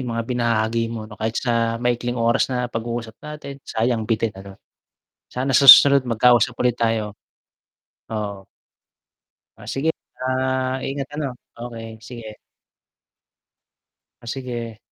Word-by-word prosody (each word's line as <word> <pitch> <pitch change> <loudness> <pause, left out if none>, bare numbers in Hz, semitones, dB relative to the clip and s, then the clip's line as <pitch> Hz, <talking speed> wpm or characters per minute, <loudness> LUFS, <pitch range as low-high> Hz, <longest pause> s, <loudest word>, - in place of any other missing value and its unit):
yung 120 -3 -4
mga 115 - -2
binahagi 115 -2 0
mo 115 -2 -5
kahit 110 +2 -3
sa 115 -2 0
maikling 120 0 -1
oras 115 0 +2
na 125 -1 -1
pag-uusap 115 0 -4
natin 150 -2 -8
sayang 115 0 -1
bitin 115 -1 0
ano, 95 0 -11 0.8
sana 130 +1 0
sa 140 - +4
susunod 140 +1 +10
magkausap 120 0 +3
ulit 125 -1 +2
tayo, 110 -3 -1 1.0
oo. 100 -3 -4 1.1
Ah, - - -12
sige, 150 +4 +1 0.3
ah, 130 0 -1
ingat 135 0 -3
ano. 150 -1 -2 0.3
Okey 115 -1 -8 0.2
sige. 115 -2 -9 1.9
Oh, - - -13
sige. 120 -3 -5
120 Hz, 120 wpm, -22 LUFS, 115-130 Hz, 1.9 s, susunod